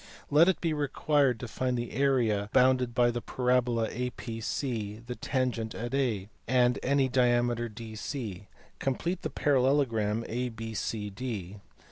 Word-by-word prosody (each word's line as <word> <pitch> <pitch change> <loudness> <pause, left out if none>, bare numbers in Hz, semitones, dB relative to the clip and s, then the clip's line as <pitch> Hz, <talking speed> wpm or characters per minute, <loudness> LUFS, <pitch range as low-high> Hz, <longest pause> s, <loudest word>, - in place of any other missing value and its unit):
Let 160 +5 +6
it 190 - +1
be 165 -2 0
required 145 -3 +1
to 120 - -4
find 125 +2 -1
the 120 0 -3
area 115 -6 +1
bounded 125 -2 +4
by 120 -1 +4
the 120 0 -3
parabola 125 -3 +1
A 125 +2 -2
PC 115 -2 -4
the 125 - -4
tangent 125 -4 -2
at 120 +2 -4
A, 120 -8 0 0.2
and 125 0 +3
any 140 0 +2
diameter 120 -2 +2
DC. 110 - -6 0.3
Complete 170 +7 -1
the 155 - -3
parallelogram 125 -6 +2
A 125 +2 -2
BCD. 110 -2 -4
120 Hz, 135 wpm, -29 LUFS, 115-130 Hz, 0.3 s, Let